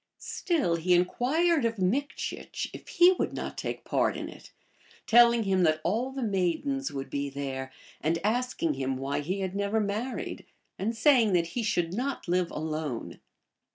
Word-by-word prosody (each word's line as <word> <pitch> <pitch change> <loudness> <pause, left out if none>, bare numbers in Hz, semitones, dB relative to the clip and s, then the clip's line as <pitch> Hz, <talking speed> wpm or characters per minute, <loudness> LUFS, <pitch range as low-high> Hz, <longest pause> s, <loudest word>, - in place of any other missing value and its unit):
Still 295 - 0
he 180 +2 +3
inquired 285 - +2
of 230 -1 0
Mikchieh 235 +11 -2
if - - -10
he 350 +1 +6
would - - 0
not - - -5
take - - -4
part - - +1
in - - -5
it, - - -13 0.5
telling 235 0 +6
him 190 -2 +2
that 155 -2 +3
all 225 +10 0
the 265 -1 -4
maidens 220 - 0
would 135 -1 -5
be 140 0 -2
there, 135 -1 -5 0.3
and 165 +2 +1
asking 225 -7 0
him 135 -1 -2
why 135 +2 -2
he 185 +7 -2
had 190 0 -3
never 200 +2 0
married, 215 +5 -3 0.3
anc 225 +4 -1
saying 230 -3 +4
that 170 -1 +2
he 240 - -2
should 175 -6 0
not 255 +3 -3
live 180 0 +1
alone. 155 -5 -4
195 Hz, 165 wpm, -28 LUFS, 165-245 Hz, 0.5 s, he